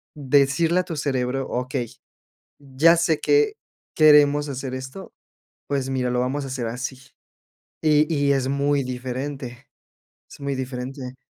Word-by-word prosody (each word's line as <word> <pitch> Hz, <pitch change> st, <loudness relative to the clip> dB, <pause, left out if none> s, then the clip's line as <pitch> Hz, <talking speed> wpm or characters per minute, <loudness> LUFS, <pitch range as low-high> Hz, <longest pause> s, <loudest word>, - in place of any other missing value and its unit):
decirle 145 Hz, +5 st, +2 dB
a -, -, -7 dB
tu 170 Hz, -3 st, -5 dB
cerebro: 135 Hz, -2 st, -1 dB
"Okey, 125 Hz, -1 st, -3 dB, 0.7 s
ya 145 Hz, +5 st, +3 dB
sé 160 Hz, -2 st, +1 dB
que 430 Hz, 0 st, +3 dB, 0.4 s
queremos 145 Hz, -1 st, +5 dB
hacer 130 Hz, -1 st, -5 dB
esto. 130 Hz, +9 st, -8 dB, 0.6 s
Pues 135 Hz, -2 st, -2 dB
mira, 125 Hz, -2 st, -1 dB
lo 125 Hz, 0 st, +1 dB
vamos 135 Hz, +3 st, -2 dB
a -, -, -6 dB
hacer 130 Hz, -2 st, -3 dB
así". 125 Hz, +3 st, -5 dB, 0.8 s
Y 155 Hz, +1 st, +3 dB
y, 140 Hz, -2 st, +2 dB
es 135 Hz, -1 st, 0 dB
muy 140 Hz, 0 st, +1 dB
diferente. 130 Hz, 0 st, -6 dB, 0.6 s
Es -, -, -13 dB
muy 140 Hz, -1 st, -2 dB
diferente. 130 Hz, 0 st, -6 dB
135 Hz, 140 wpm, -23 LUFS, 130-145 Hz, 0.8 s, queremos